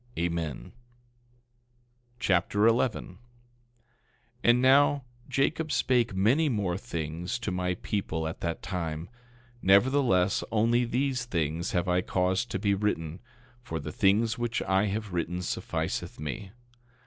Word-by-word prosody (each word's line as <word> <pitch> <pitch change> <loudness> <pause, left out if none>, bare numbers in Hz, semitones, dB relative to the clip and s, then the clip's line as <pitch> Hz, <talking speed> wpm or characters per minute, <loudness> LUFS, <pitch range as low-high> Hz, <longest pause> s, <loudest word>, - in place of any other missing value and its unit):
Amen. 85 -5 -1
2 - - -12
Nephi - - -15 1.5
Chapter 100 -1 +2
11 115 +1 +2
11:1 90 - -14 1.3
And 120 +1 +5
now, 140 +2 +4 0.3
Jacob 150 +4 0
spake 120 -5 +2
many 125 +12 +3
more 100 -7 0
things 85 -4 -4
to 115 -4 -4
my 90 0 -1
people 85 -5 -3
at 80 - -6
that 85 -1 -3
time; 85 -2 -4 0.5
nevertheless 100 -2 +3
only 115 +2 +3
these 125 +1 -1
things 85 -4 -2
have 90 0 0
I 90 0 +2
caused 95 +4 0
to - - -2
be 100 +1 +1
written, 90 -5 -2 0.4
for 80 -9 -5
the 75 +1 -6
things 110 +6 +2
which 120 -1 -1
I 95 +2 +2
have 105 -1 -3
written 90 +1 -2
sufficeth - - -3
me. 75 +6 -5
95 Hz, 135 wpm, -28 LUFS, 85-120 Hz, 1.5 s, And